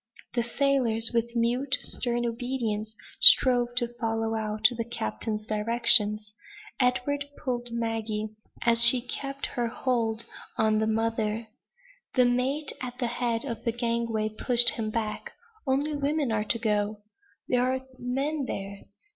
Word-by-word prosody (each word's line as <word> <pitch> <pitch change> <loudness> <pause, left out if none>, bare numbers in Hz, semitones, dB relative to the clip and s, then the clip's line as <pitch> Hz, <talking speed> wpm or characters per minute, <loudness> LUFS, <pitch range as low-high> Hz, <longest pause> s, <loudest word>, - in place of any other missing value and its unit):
The 240 - +1
sailors, 235 -2 +1
with 235 +1 -1
mute, 245 +3 +1
stern 240 -1 -2
obedience, 230 -3 -3 0.2
strove 245 - +7
to 240 -1 0
follow 225 -1 -1
out 215 -1 +2
the 230 - -2
captain's 215 - -4
directions. 210 -1 +2 0.5
Edward 280 +3 +1
pulled 245 -3 -3
Maggie, 225 -2 -2 0.4
and 230 -1 +5
she 235 +2 +8
kept 275 +3 -4
her 240 -1 -2
hold 230 -2 0 0.3
on 220 -2 +2
the 220 - 0
mother. 225 0 -1 0.7
The 250 -2 +5
mate, 260 +5 0
at 250 -1 -6
the 250 - -1
head 235 0 -2
of 235 -5 -5
the 230 - 0
gangway, 230 -2 -1
pushed 240 +2 +2
him 220 -2 -3
back. 215 -1 -4 0.3
"Only 285 +3 0
women 285 -2 0
are 215 -1 0
to 230 - +1
go!" 210 -2 -1 0.4
"There 250 -1 +2
are 260 +1 -1
men 275 +4 -2
there." 195 0 -6
235 Hz, 140 wpm, -27 LUFS, 220-250 Hz, 0.7 s, she